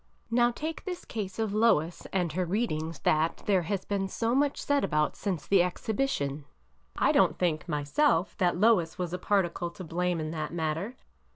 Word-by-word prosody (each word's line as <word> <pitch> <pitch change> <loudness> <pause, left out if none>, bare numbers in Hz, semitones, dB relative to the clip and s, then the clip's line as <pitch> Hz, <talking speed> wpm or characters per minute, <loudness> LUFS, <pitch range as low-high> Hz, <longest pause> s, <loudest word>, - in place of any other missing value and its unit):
Now 240 0 +4
take 310 +6 -5
this 360 -2 -5
case 200 -4 -5
of 220 -2 -1
Lois 195 -7 +2
and 180 -4 0
her 185 +2 0
readings, 165 -5 -2
that 155 +2 +1
there 195 -3 +3
has 190 +3 -3
been 195 -1 -1
so 230 +4 -1
much 280 +1 +2
said 285 -1 +1
about 150 0 +1
since 185 -7 -3
the 195 -2 +4
exhibition, 180 - -1 0.5
I - - +3
don't - - +3
think, 170 -2 -1
myself, 165 - +1
that 175 -2 +2
Lois 185 -7 +3
was 180 -2 -3
a 180 - -2
particle 180 -3 0
to 185 +2 -10
blame 175 +1 -1
in 155 0 -3
that 155 -1 -4
matter. 165 +7 -2
180 Hz, 180 wpm, -29 LUFS, 165-220 Hz, 0.5 s, Now